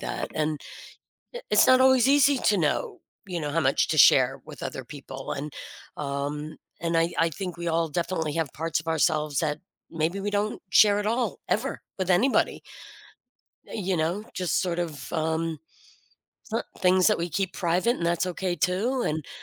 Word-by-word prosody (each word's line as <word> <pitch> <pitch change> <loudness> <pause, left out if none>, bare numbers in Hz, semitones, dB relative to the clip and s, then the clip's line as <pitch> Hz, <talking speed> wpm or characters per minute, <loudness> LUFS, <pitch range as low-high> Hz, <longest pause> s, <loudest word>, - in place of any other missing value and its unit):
that, - - -4
and 155 -1 -1 0.8
i - - -4
it's 210 - +6
not 255 0 +6
always 260 -1 +5
easy 285 -1 +5
to 205 - +2
know, 380 - -1 0.3
you 175 -2 -3
know, 145 -1 -3
how 165 - +1
much 135 0 +2
to - - 0
share - - +6
with - - -10
other 130 - -5
people 135 0 -8
and, 145 +1 -6 0.4
um, 145 +2 -4 0.2
and 170 0 0
I 165 +1 +1
I 165 - +3
think 180 +1 -6
we 170 0 -4
all 165 0 +1
definitely 165 -1 -2
have 160 -4 -2
parts 165 +1 -1
of 160 - -12
ourselves 155 -2 +1
that 150 -2 -1 0.3
maybe 165 +4 -1
we 205 +1 -2
don't 205 +1 -1
share 205 -1 +6
at 205 - -3
all 235 +2 -1
ever - - -1 0.2
with 185 0 -2
anybody. 205 +10 +2 1.1
Eh, - - -10
you 190 -3 -1
know, 170 +6 -1
just, 180 -2 0
sort 175 -2 -2
of, 160 -6 -5
um 160 0 -1 0.9
som 230 -2 -2 0.2
things 185 0 +4
that - - +3
we 170 +1 -3
keep 190 +3 -2
private 185 +7 +1
and - - -5
that's 170 +1 +1
okay 180 0 -2
too 220 +9 0
and 155 0 -2
yeah. - - -13
170 Hz, 185 wpm, -26 LUFS, 155-200 Hz, 1.1 s, it's